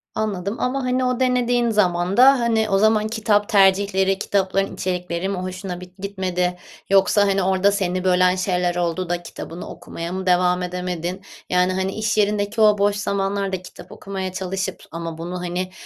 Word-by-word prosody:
Anladım 205 -1 -2
ama, 265 +2 -1
hani, 255 0 0
o 250 0 0
denediğin 245 -2 +2
zaman 185 -3 +1
da, 265 +2 +7
hani, 225 -2 +1
o 195 - +3
zaman 215 +1 +3
kitap 215 -2 +1
tercihleri, 195 -1 +3
kitapların 195 -1 0
içerikleri 180 0 -3
mi 195 - -2
hoşuna 185 0 -5
bit 180 +1 -13
gitmedi 185 -2 -2 0.3
yoksa, 195 +1 +4
hani, 195 -1 +1
orada 190 +2 +3
seni 185 -2 -1
bölen 185 0 +3
şeyler 180 -1 0
oldu 175 0 -2
da 175 0 -2
kitabını 170 0 -8
okumaya 170 +1 -7
mı 190 0 -4
devam 180 0 +3
edemedin? 180 0 -4 0.3
Yani, 180 +1 +2
hani, 190 +1 -1
iş 215 0 -1
yerindeki 205 +1 +1
o 210 -1 +5
boş 200 0 +2
zamanlarda 195 -2 -2
kitap 185 - -13
okumaya 190 -2 -5
çalışıp 190 0 -4
ama 165 0 -6
bunu, 175 +2 -5
hani, 180 +1 -3
190 Hz, 165 wpm, -21 LUFS, 180-205 Hz, 0.3 s, da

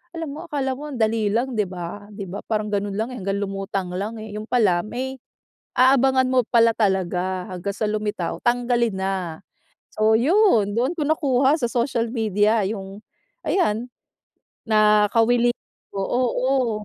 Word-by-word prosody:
alam 320 -4 -5
mo 310 - -7
akala 270 -4 -2
mo 295 +3 -8
ang 255 - -6
dali 220 -2 +1
lang, 240 +2 -1
'di 210 - +2
ba? 185 +3 -7
Di 200 -2 -7
ba 195 +4 -6
parang 215 -1 -1
ganun 205 0 -1
lang 220 +2 -1
eh, 250 - -6
hanggang 195 +1 -2
lumutang 195 -1 -3
lang 215 +4 -4
eh, 215 -1 -8
yun 215 - -4
pala 195 -8 +3
may 260 +4 -4 0.6
aabangan 260 0 +4
mo 255 -1 +4
pala 230 -1 +4
talaga 185 -2 0
hanggang 185 +2 -4
sa 215 - -1
lumitaw, 210 -5 -2
tanggalin 240 -2 +1
na. 190 -4 -3 0.5
So 215 +1 +3
yun, 265 - +3
doon 260 +8 +1
ko 300 - -1
nakuha 280 -1 +2
sa 240 - +1
social 235 -1 0
media 215 -1 +2
yung 200 0 -7 0.4
ayan, 245 - 0 0.8
nakawili 220 +3 +4 0.4
oh, 195 - -1
oo. 255 0 +1
220 Hz, 155 wpm, -23 LUFS, 200-255 Hz, 0.8 s, aabangan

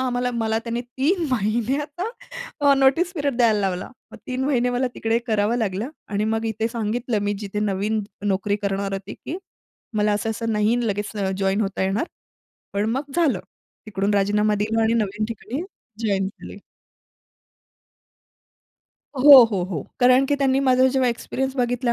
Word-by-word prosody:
आम्हाला 250 -1 0
मला 225 -1 0
त्याने 230 +1 -3
3 280 +9 0
महिन्याचं 255 - -1 0.5
अ, 285 -1 +5
नोटीस 275 +7 +3
पिरियड 285 -5 -1
द्यायला 225 -4 +3
लावला. 185 -2 -2 0.2
मग - - -10
3 255 +1 -2
महिने 250 -3 +1
मला 245 +1 0
तिकडे 225 +1 0
करावं 215 0 +1
लागलं 215 +2 -2 0.2
आणि 210 +1 -1
मग 225 +1 -1
इथे 220 +1 -1
सांगितलं 230 0 -2
मी 205 0 0
जिथे 210 0 -4
नवीन 210 +1 0 0.2
नोकरी 200 +1 0
करणार 195 0 -1
होती 195 +1 -5
की 335 - -6 0.6
मला 210 0 +2
असं-असं 225 +2 -2
नाही 210 +2 +2
लगेच 205 +1 -2
अ, 195 -2 -1
जॉइन 195 +2 +1
होता 195 -2 -1
येणार. 195 - 0 0.7
पण 205 +2 0
मग 275 +4 -3
झालं. 290 - +2 0.5
तिकडून 200 0 -1
राजीनामा 210 +1 +2
दिला 220 +2 0
आणि 225 +1 +2
नवीन 215 -1 -1
ठिकाणी 230 +6 -5 0.4
जॉइन 195 -2 +1
झाले. 195 - -11 2.6
हो, 275 -1 +10
हो, 195 -4 -1
हो. 175 -6 -4 0.2
कारण 255 +2 +6
की 285 - +1
त्यांनी 270 -1 +2
माझा 260 -1 +4
जेव्हा 260 -2 +2
एक्सपिरियन्स 265 +3 -3
बघितला 245 0 +1
225 Hz, 155 wpm, -23 LUFS, 205-255 Hz, 2.6 s, हो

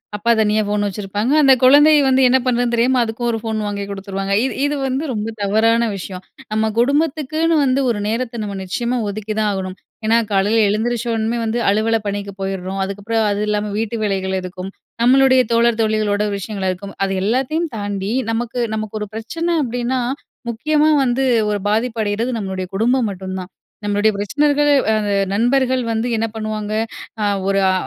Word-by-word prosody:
அப்பா 220 +3 +1
தனியா 215 0 +2
ஃபோன் 205 0 0
வச்சுருப்பாங்க, 205 +4 -2
அந்த 270 -2 +7
குழந்தை 290 +4 +7
வந்து 265 0 +3
என்ன 260 - +5
பண்றதுன்னு 245 -1 +1
தெரியாம 250 +2 +2
அதுக்கும் 230 +1 -3
ஒரு 225 - -2
ஃபோன் 220 -1 -2
வாங்கி 200 -1 -3
குடுத்துருவாங்க. 195 0 -4
இது - - -2
இது 290 +1 0
வந்து 265 +3 -1
ரொம்ப 210 -1 -3
தவறான 225 +3 +2
விஷயம். 185 0 -7 0.3
நம்ம 220 0 +1
குடும்பத்துக்குன்னு 310 +4 +1
வந்து 265 +1 +2
ஒரு 220 -3 0
நேரத்த 230 +1 -2
நம்ம 200 -1 -5
நிச்சயமா 240 +6 -2
ஒதுக்கி 215 +1 -4
தான் 215 -1 +2
ஆகணும். 190 -1 -4 0.3
ஏன்னா 225 +1 +4
காலைல 205 +3 +2
எழுந்திரிச்ச 235 +3 -1
உடன்மே 225 +1 -1
வந்து 225 +2 -1
அலுவல 220 +2 +2
பணிக்கு 200 0 -4
போயிர்றோம், 195 0 -3
அதுக்கப்றம் 205 +3 -1
அது 205 - -1
இல்லாம 210 0 -1
வீட்டு 225 +1 -2
வேலைகள் 190 -2 -1
இருக்கும். 185 +1 -7 0.3
நம்மளுடைய 260 +1 +5
தோழர், 230 0 +3
தோழிகளோட 215 -1 +1
விஷயங்கள் 195 -1 -3
இருக்கும். 200 +2 -7
அது 195 - 0
எல்லாத்தயும் 270 +9 0
தாண்டி 205 0 -3 0.2
நமக்கு 235 +2 -2
நமக்கு 215 0 -4
ஒரு 210 - -3
பிரச்சன 330 +10 -2
அப்டின்னா, 245 +1 -1 0.5
முக்கியமா 300 +6 +2
வந்து 260 +1 +1 0.3
ஒரு 205 - -1
பாதிப்பு 225 +2 0
அடையிறது 215 +4 -1
நம்மளுடய 190 -2 -4
குடும்பம் 240 +3 +2
மட்டும் 190 0 -6
தான். 185 0 -8 0.3
நம்மளுடய 205 +1 +2
பிரச்சனைகள் 290 +8 +1 0.2
அ - - +3
அந்த 205 -1 -1 0.2
நண்பர்கள் 255 +3 +2
வந்து 225 +1 -1
என்ன 225 0 0
பண்ணுவாங்க 215 -1 -4 0.5
அ - - +1 0.2
ஒரு 195 0 +2
அ - - +2
220 Hz, 170 wpm, -19 LUFS, 205-245 Hz, 0.5 s, அந்த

